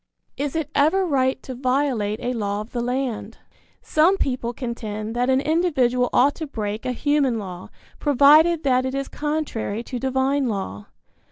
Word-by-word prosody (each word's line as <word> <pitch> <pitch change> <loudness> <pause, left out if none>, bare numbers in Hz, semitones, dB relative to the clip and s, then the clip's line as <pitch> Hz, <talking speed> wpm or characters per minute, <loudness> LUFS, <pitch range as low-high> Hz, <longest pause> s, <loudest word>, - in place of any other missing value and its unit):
Is 285 +1 -3
it 310 -2 -2
ever 345 +7 +3
right 265 -5 +1
to 260 - -6
violate 250 -5 0
a 250 - -1
law 205 -3 -2
of 215 - -10
the 240 - -2
land? 250 -1 -3 0.5
Some 340 +6 +3
people 250 -6 -1
contend 225 -3 -5
that 245 +1 +1
an 260 0 +4
individual 270 -6 +1
ought 280 +3 +4
to 315 - -5
break 215 -3 -4
a - - 0
human 275 -1 +1
law, 185 -4 -7 0.3
provided 305 +4 +5
that 255 -2 +2
it 260 +1 -3
is 275 0 -2
contrary 295 -8 -3
to 250 0 -5
divine 265 +1 0
law. 105 - -4
260 Hz, 165 wpm, -23 LUFS, 235-290 Hz, 0.5 s, provided